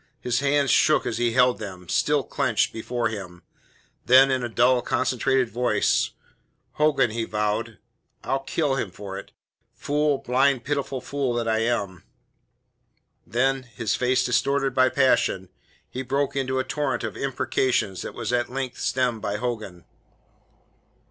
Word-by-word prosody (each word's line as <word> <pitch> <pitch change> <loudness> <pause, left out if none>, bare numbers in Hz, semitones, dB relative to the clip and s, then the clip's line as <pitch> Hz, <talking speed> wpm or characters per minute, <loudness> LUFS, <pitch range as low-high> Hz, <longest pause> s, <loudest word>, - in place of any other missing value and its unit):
His 125 -1 0
hands 140 -1 +2
shook - - +4
as 115 - -2
he 120 -1 +1
held 125 0 +3
them, 95 -4 -8
still - - +1
clenched, - - 0
before 120 +1 -2
him. 90 -5 -8 0.6
Then, 130 +2 +7
in 130 -1 0
a 120 - -2
dull, 120 +2 +3
concentrated 130 0 0
voice: 120 -3 +1 0.6
"Hogan," 150 -6 +2
he 115 +1 -2
vowed, 105 0 -2 0.5
"I'll 135 - 0
kill 135 0 -1
him 110 - -2
for 95 +1 -7
it. - - -13 0.4
Fool, 145 +3 0
blind, 130 0 +1
pitiful 140 -2 -2
fool 135 -2 -2
that 120 -1 -1
I 110 0 +1
am." 100 -6 -1 1.3
Then 130 +6 +1
his 120 -3 -3
face 125 0 +1
distorted 135 +3 +1
by 130 0 +4
passion 125 -8 +2 0.4
he 130 - -5
broke 135 +2 -1
into 130 -1 -1
a 130 - +1
torrent 130 -2 -2
of - - -4
imprecations 130 -7 -1
that - - -7
was 120 0 -3
at 120 0 0
length 130 -1 -4
stemmed 125 -4 0
by 100 - -2
Hogan. 110 -7 -5
125 Hz, 150 wpm, -24 LUFS, 115-135 Hz, 1.3 s, Then